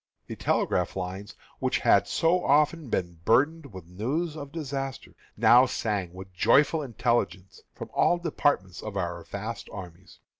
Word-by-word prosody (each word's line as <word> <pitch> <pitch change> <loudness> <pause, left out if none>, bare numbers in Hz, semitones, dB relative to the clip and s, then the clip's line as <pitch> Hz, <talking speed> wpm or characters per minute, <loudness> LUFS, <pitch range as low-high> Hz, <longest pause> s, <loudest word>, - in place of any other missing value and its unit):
The - - -7
telegraph 90 -1 0
lines, 95 +2 -5 0.2
which - - +1
had - - +3
so 175 +2 +2
often 150 0 +2
been 85 -5 -2
burdened 145 - +2
with 95 -3 -10
news 135 - -3
of 145 -2 -8
disaster, 135 -4 -5 0.2
now 125 +2 +6
sang 105 -7 -2
with 95 +1 -11
joyful 145 - +3
intelligence 115 - -2
from - - -8
all 175 - +3
departments 145 - -1
of 105 -2 -6
our 85 -2 -3
vast 105 +4 -6
armies. 90 -2 -10
115 Hz, 145 wpm, -27 LUFS, 95-145 Hz, 0.2 s, now